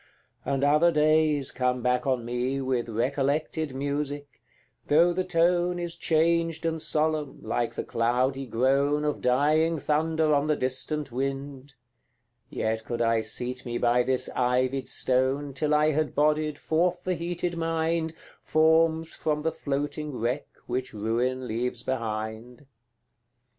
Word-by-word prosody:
and 140 0 -1
other 150 +4 +4
days 155 -2 +3
come 125 -1 -1
back 125 +2 +1
on 125 -3 0
me 125 +3 -1
With 130 -3 -1
recollected 140 +5 -1
music, 145 0 -4 0.5
though 170 +4 +4
the 185 +1 0
tone 175 0 +2
Is 175 -1 -4
changed 165 0 +1
and 160 -1 -1
solemn, 155 -2 0
like 120 -1 -2
the - - -3
cloudy 130 +3 0
groan 140 +5 +1
Of 150 - -1
dying 155 +6 +2
thunder 155 +1 +1
on 145 +1 +2
the 155 - +2
distant 135 +3 0
wind; 135 +1 -4 0.7
Yet 110 0 -2
could 120 +1 -2
I 115 -1 +2
seat 125 +3 -3
me 120 -2 -3
by 120 +1 +3
this 130 +1 0
ivied 130 +2 +1
stone 130 +2 0
Till 150 +3 +1
I 150 +1 +3
had 155 0 -1
bodied 150 0 +1
forth 175 +2 0
the 185 - 0
heated 175 0 -3
mind, 165 0 -1 0.3
Forms 160 +1 +3
from 150 -1 -2
the 160 - +1
floating 145 +1 -3
wreck 120 +5 -2 0.2
which 125 +1 -3
ruin 120 +4 -1
leaves 120 +1 -2
behind; 115 0 -4
CV. - - -21
145 Hz, 140 wpm, -27 LUFS, 125-160 Hz, 0.7 s, other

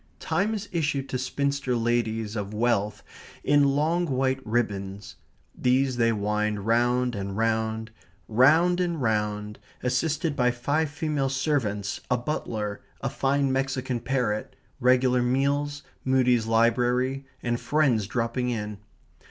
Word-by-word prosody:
Time 195 +7 0
is 205 -1 -5
issued 145 -5 -1
to 130 - -2
spinster 140 0 -1
ladies 115 -2 0
of 105 -1 -4
wealth 105 -3 0 0.4
in 145 0 +4
long 155 +5 +2
white 130 -1 0
ribbons. 100 -3 -2 0.4
These 130 0 +1
they 115 -1 +3
wind 105 -1 -1
round 120 +2 +2
and 100 -1 -4
round, 110 0 0 0.4
round 155 +10 +4
and 170 -3 -1
round, 105 -3 -1 0.2
assisted 145 +5 0
by 125 -2 +3
five 140 +6 0
female 150 -3 -1
servants, 130 -8 -1
a 125 - +3
butler, 110 -6 -3 0.2
a - - -2
fine 140 0 +1
Mexican 130 -2 -1
parrot, 120 -4 -1 0.2
regular 125 0 +3
meals, 140 +3 0 0.2
Mudie's 125 -3 +2
library, 125 +4 +2 0.2
and 120 0 0
friends 130 -9 +2
dropping 120 +2 -1
in. 105 -3 -4
125 Hz, 125 wpm, -26 LUFS, 110-140 Hz, 0.4 s, in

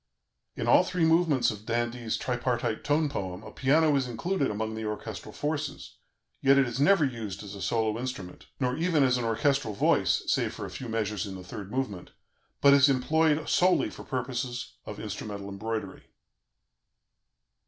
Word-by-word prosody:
In - - -3
all - - +6
three 180 -3 0
movements 160 -6 +3
of 105 -1 -9
d'Indy's 120 -1 -1
tripartite 120 -2 -1
tone 150 +1 +2
poem 95 -10 -5
a - - -9
piano 150 +3 +3
is 135 -2 +1
included 140 +6 -1
among 110 +1 -3
the 110 0 -5
orchestral 105 -1 -5
forces; 150 0 -4 0.4
yet 135 0 +5
it 135 - +5
is 120 +1 -4
never 160 +2 +5
used 110 -7 -5
as 100 -1 -8
a 100 - -8
solo 110 +2 0
instrument, 120 -8 -6
nor 125 -2 0
even 160 -2 +2
as 125 -1 +3
an 120 - -2
orchestral 115 0 +1
voice - - +2
(save - - 0
for - - -5
a - - -8
few 125 - -7
measures 105 -2 -2
in 95 - -6
the 95 - -8
third 95 +2 -8
movement), 105 -7 -4 0.5
but 140 0 +7
is 140 0 +6
employed 150 +3 +2
solely 180 +1 +3
for - - -10
purposes 125 -1 -4
of - - -6
instrumental 100 -2 -6
embroidery. 100 -1 -5
125 Hz, 170 wpm, -28 LUFS, 110-140 Hz, 0.5 s, but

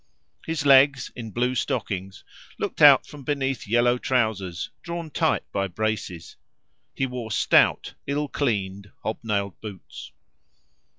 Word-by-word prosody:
His 160 -3 -2
legs, 140 -1 +5
in 115 -2 -7
blue 125 +4 0
stockings, 95 -5 -3 0.3
looked - - -4
out - - +8
from 145 - -11
beneath 135 -4 -2
yellow 120 +3 +3
trousers, 105 -10 -1
drawn 170 -2 -6
tight - - +1
by 100 -1 -1
braces, 95 -4 -4 0.6
He 135 - 0
wore 125 -3 -5
stout, 105 - +3
ill 145 +1 -1
cleaned, 100 -8 -2
hob 110 - -3
nailed 100 -3 -2
boots. 100 -5 -9
115 Hz, 125 wpm, -24 LUFS, 100-135 Hz, 0.6 s, out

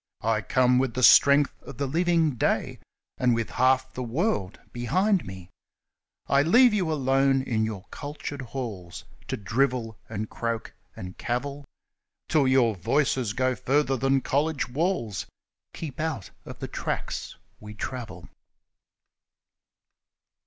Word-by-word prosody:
I 110 -1 +1
come 125 +1 +3
with 130 -1 -1
strength 140 +6 +6
of 130 - -11
the 140 - -1
living 165 +2 +2
day, 120 - -1 0.4
And 125 -2 +3
with 115 -1 -3
half 130 +1 +2
the 130 - -5
world 120 - -1
behind 185 - +1
me; 95 -1 -9 0.7
I 140 - +3
leave 230 - +5
you 185 -6 0
alone 135 -2 +2
in 110 -4 0
your 105 -3 -5
cultured 145 -1 -6
halls 115 -9 -6 0.2
To - - -3
drivel 115 +1 -1
and 110 0 -4
croak 115 0 -4 0.2
and 90 0 -9
cavil: 140 +4 -3 0.6
Till 150 -4 +3
your 130 -4 +4
voice 135 - +1 0.2
goes 130 +1 0
further 135 0 +1
than 135 +1 +1
college 145 +2 0
walls, 130 - -1 0.5
Keep 150 -5 -7
out 155 - -3
of - - -9
the - - -5
tracks - - -4 0.2
we 105 0 -10
travel 120 +2 -6
130 Hz, 130 wpm, -26 LUFS, 115-145 Hz, 0.7 s, strength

